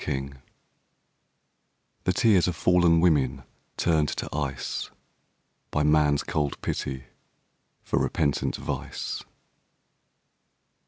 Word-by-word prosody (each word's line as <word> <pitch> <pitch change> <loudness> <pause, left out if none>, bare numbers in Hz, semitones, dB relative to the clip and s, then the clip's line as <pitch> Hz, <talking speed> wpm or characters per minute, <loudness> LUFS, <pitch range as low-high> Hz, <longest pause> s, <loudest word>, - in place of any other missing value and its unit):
DIAMONDS 70 -1 -3 1.7
The 90 - +2
tears 100 -4 +4
of 90 - -1
fallen 85 -1 +4
women 70 -6 +2 0.3
turned 80 -3 +2
to - - -4
ice 70 -3 -3 0.8
By 75 - 0
man's 75 -1 +3
cold 75 -2 -2
pity 65 0 -3 0.8
for - - 0
repentant 70 -3 0
vice. - - -4
75 Hz, 90 wpm, -26 LUFS, 70-85 Hz, 1.7 s, tears